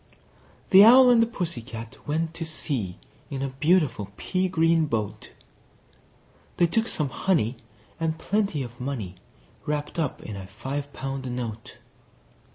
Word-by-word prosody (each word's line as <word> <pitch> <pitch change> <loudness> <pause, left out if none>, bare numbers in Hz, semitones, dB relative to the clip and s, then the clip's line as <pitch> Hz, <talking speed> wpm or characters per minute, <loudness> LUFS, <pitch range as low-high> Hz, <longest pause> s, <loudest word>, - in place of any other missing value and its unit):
The 195 +1 +10
Owl 250 +3 +9
and 235 -1 +6
the 230 - +3
Pussy 175 - -4
Cat 115 -1 -8
went 160 +2 -1
to 165 - -5
sea 135 - -3 0.3
In 135 -1 -3
a 135 - -1
beautiful 145 - +1
pea 185 0 -1
green 165 -2 +3
boat: 110 -6 -3 1.3
They 175 - +5
took 225 +7 +1
some 150 - -1
honey, 135 - 0 0.4
and 160 -1 -1
plenty 200 -6 0
of 120 0 -10
money 115 -9 -4 0.5
Wrapped 150 +2 -2
up 155 -5 -2
in 105 - -6
a 95 -1 -7
five 140 +8 -5
pound 135 -1 -5
note. 115 -3 -6
145 Hz, 145 wpm, -26 LUFS, 120-170 Hz, 1.3 s, The